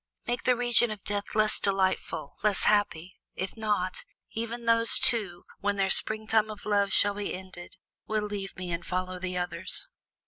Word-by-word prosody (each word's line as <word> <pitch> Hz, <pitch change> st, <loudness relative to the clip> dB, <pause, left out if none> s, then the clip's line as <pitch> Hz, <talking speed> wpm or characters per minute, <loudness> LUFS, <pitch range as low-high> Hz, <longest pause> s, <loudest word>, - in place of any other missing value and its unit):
"Make 240 Hz, 0 st, -3 dB
the 250 Hz, -, +4 dB
region 240 Hz, -1 st, +2 dB
of 215 Hz, -2 st, -7 dB
Death 205 Hz, 0 st, -3 dB
less 215 Hz, 0 st, +5 dB
delightful, 190 Hz, -7 st, -1 dB
less 210 Hz, -2 st, +2 dB
happy; 190 Hz, -4 st, 0 dB, 0.2 s
if 190 Hz, 0 st, -5 dB
not, 210 Hz, -4 st, -2 dB, 0.3 s
even 230 Hz, +1 st, -5 dB
those 230 Hz, 0 st, +5 dB
two 195 Hz, -7 st, +2 dB
when 205 Hz, +1 st, -1 dB
their 195 Hz, -1 st, +1 dB
springtime 220 Hz, 0 st, +3 dB
of 210 Hz, -1 st, -9 dB
love 205 Hz, -1 st, +1 dB
shall 205 Hz, 0 st, +3 dB
be 205 Hz, -2 st, -4 dB
ended 185 Hz, -1 st, -11 dB, 0.3 s
will 215 Hz, -1 st, -1 dB
leave 200 Hz, -2 st, -6 dB
me 180 Hz, -1 st, -5 dB
and 170 Hz, 0 st, -3 dB
follow 185 Hz, +1 st, -4 dB
the 180 Hz, 0 st, -4 dB
others." 180 Hz, -, -3 dB
205 Hz, 170 wpm, -27 LUFS, 185-215 Hz, 0.3 s, less